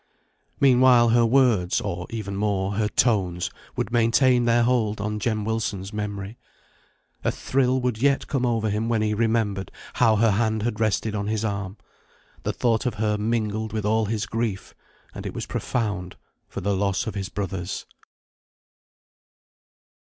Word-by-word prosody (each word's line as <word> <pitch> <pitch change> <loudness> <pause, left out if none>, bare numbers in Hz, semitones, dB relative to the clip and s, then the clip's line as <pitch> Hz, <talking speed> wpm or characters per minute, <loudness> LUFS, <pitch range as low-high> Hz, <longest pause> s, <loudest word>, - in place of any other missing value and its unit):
Meanwhile, 125 -3 +6
her 120 0 +4
words 115 -8 +3
or, 90 +1 -4
even 105 -3 -5
more, 100 -1 0
her 105 +1 0
tones 95 -6 +1 0.2
would - - -2
maintain 120 +1 +3
their 120 0 +4
hold 115 -4 +1
on 105 +1 -2
Jem 110 -2 -1
Wilson's 105 -3 -3
memory. 105 +1 -5 0.8
A - - +2
thrill 130 -1 +1
would 120 -3 -1
yet 140 0 +2
come 135 -4 -1
over 115 -3 +1
him 110 +3 -1
when 110 -2 +1
he 105 0 +1
remembered 110 -3 0 0.2
how 115 -3 +4
her 110 +1 +3
hand 110 +1 0
had 115 -2 -2
rested 110 0 0
on 100 -1 -2
his 110 0 -1
arm. 100 -1 -3 0.6
The - - -1
thought 115 0 0
of 120 - -2
her 105 0 0
mingled 110 -1 -1
with 110 -2 -2
all 110 +1 +2
his 105 0 -2
grief, 110 -4 -3 0.4
and - - -7
it - - -7
was - - -4
profound, 100 -6 -3 0.3
for - - -6
the 100 +1 0
loss 100 +3 0
of 110 - -4
his 100 -1 -4
brothers. 95 -2 -4
110 Hz, 160 wpm, -24 LUFS, 100-115 Hz, 0.8 s, Meanwhile